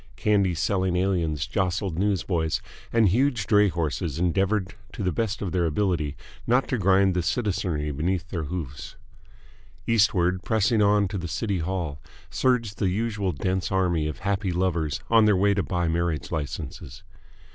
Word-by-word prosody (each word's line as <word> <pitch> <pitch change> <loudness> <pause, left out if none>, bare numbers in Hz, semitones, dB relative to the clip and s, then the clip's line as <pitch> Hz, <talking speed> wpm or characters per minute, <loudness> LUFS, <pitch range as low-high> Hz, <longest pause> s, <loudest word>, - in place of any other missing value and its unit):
Candy 100 -4 +2
selling 95 +1 0
aliens 85 -6 0
jostled 95 -2 -1
newsboys, 90 -5 0 0.3
and 115 -4 +4
huge 120 0 +1
dray 105 -1 +4
horses 85 -3 -2
endeavoured 95 +3 0 0.2
to - - -5
the 90 - +1
best 110 +4 -2
of 95 - -3
their 85 -1 +1
ability 80 -3 0 0.3
not 125 +3 +3
to 125 - 0
grind 95 0 +4
the 90 - 0
citizenry 90 -6 -1
beneath 85 +5 -2
their 85 -4 -3
hooves. 75 -4 -6 0.9
Eastward, 95 -5 +2
pressing 110 +2 +2
on 105 0 +4
to 95 +1 -4
the 85 - -4
City 100 +2 -2
Hall, 80 -4 -3 0.3
surged 115 -6 0
the 95 - +2
usual 105 -1 -1
dense 95 +5 -2
army 90 -5 +1
of 75 - -6
happy 100 -1 -1
lovers 85 -4 -1
on 115 -1 +6
their 105 -3 +4
way 100 +2 +3
to 100 - +1
buy 90 -2 -1
marriage 85 -1 -1
licenses. 75 -4 -5
95 Hz, 155 wpm, -25 LUFS, 85-100 Hz, 0.9 s, on